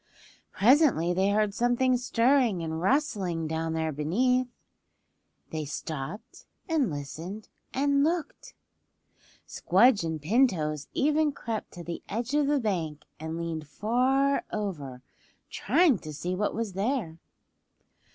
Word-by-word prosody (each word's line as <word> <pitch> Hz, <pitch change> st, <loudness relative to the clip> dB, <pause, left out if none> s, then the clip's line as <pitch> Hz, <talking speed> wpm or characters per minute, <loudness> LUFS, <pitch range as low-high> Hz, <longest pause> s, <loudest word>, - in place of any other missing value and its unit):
Presently 230 Hz, -, +4 dB
they 190 Hz, +2 st, +2 dB
heard 210 Hz, 0 st, +1 dB
something 245 Hz, +3 st, +2 dB
stirring 245 Hz, -5 st, +2 dB
and 160 Hz, 0 st, -3 dB
rustling 190 Hz, -, 0 dB
down 160 Hz, +1 st, -2 dB
there 160 Hz, -1 st, -1 dB
beneath. 245 Hz, -, +1 dB, 1.0 s
They 155 Hz, -1 st, -3 dB
stopped 155 Hz, -, -7 dB, 0.2 s
and 315 Hz, -, +1 dB
listened 165 Hz, +8 st, -7 dB, 0.2 s
and 280 Hz, +1 st, +2 dB
looked. 330 Hz, +1 st, -2 dB, 0.9 s
Squdge 210 Hz, +3 st, +3 dB
and 160 Hz, -1 st, -3 dB
Pin 230 Hz, -, +4 dB
Toes 155 Hz, -, -3 dB
even 300 Hz, +1 st, +2 dB
crept 225 Hz, -5 st, -5 dB
to 175 Hz, -, -8 dB
the 170 Hz, 0 st, -6 dB
edge 235 Hz, +5 st, -3 dB
of 295 Hz, -1 st, +2 dB
the 290 Hz, 0 st, +2 dB
bank 165 Hz, -, -2 dB
and 160 Hz, +1 st, -5 dB
leaned 165 Hz, -2 st, -4 dB
far 255 Hz, -, +1 dB
over 145 Hz, -12 st, -4 dB, 0.5 s
trying 320 Hz, -, +3 dB
to 155 Hz, -, -8 dB
see 175 Hz, +5 st, -4 dB
what 205 Hz, +3 st, -1 dB
was 225 Hz, -4 st, -3 dB
there. 195 Hz, -5 st, -2 dB
205 Hz, 125 wpm, -28 LUFS, 160-255 Hz, 1.0 s, Presently